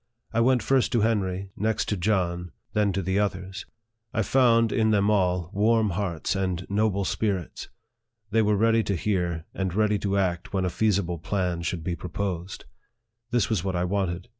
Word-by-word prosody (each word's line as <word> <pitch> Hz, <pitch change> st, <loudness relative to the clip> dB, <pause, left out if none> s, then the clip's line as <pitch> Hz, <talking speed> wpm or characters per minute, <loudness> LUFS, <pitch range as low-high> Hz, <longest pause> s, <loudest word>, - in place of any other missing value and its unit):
I 115 Hz, -, +2 dB
went 125 Hz, -1 st, +3 dB
first 135 Hz, +2 st, +2 dB
to 120 Hz, -, +3 dB
Henry, 100 Hz, -3 st, 0 dB
next 110 Hz, +2 st, 0 dB
to 105 Hz, -, +1 dB
John, 90 Hz, -3 st, 0 dB, 0.2 s
then 105 Hz, -1 st, +2 dB
to 95 Hz, +1 st, -1 dB
the 95 Hz, +3 st, 0 dB
others. 95 Hz, -2 st, -3 dB, 0.5 s
I 110 Hz, -, +2 dB
found, 115 Hz, -2 st, +4 dB
in 110 Hz, -1 st, +2 dB
them 105 Hz, -1 st, +3 dB
all, 90 Hz, -3 st, +1 dB
warm 110 Hz, +1 st, +3 dB
hearts 85 Hz, -2 st, -2 dB
and 90 Hz, -2 st, -2 dB
noble 100 Hz, -1 st, +1 dB
spirits. 95 Hz, -6 st, -2 dB, 0.6 s
They 115 Hz, +1 st, +4 dB
were 105 Hz, -1 st, +2 dB
ready 115 Hz, +2 st, +4 dB
to 100 Hz, -2 st, -1 dB
hear, 85 Hz, -4 st, -1 dB
and 95 Hz, -2 st, -2 dB
ready 105 Hz, -1 st, +2 dB
to 100 Hz, 0 st, 0 dB
act 90 Hz, -3 st, -1 dB
when 95 Hz, -1 st, +1 dB
a 90 Hz, -, -1 dB
feasible 95 Hz, -6 st, 0 dB
plan 90 Hz, -1 st, -1 dB
should 85 Hz, -1 st, -3 dB
be 85 Hz, +1 st, -2 dB
proposed. 90 Hz, 0 st, -4 dB, 0.6 s
This 120 Hz, -4 st, +1 dB
was 105 Hz, -7 st, 0 dB
what 95 Hz, -1 st, -2 dB
I 90 Hz, -, 0 dB
wanted. 90 Hz, -1 st, -1 dB
100 Hz, 180 wpm, -26 LUFS, 90-110 Hz, 0.6 s, found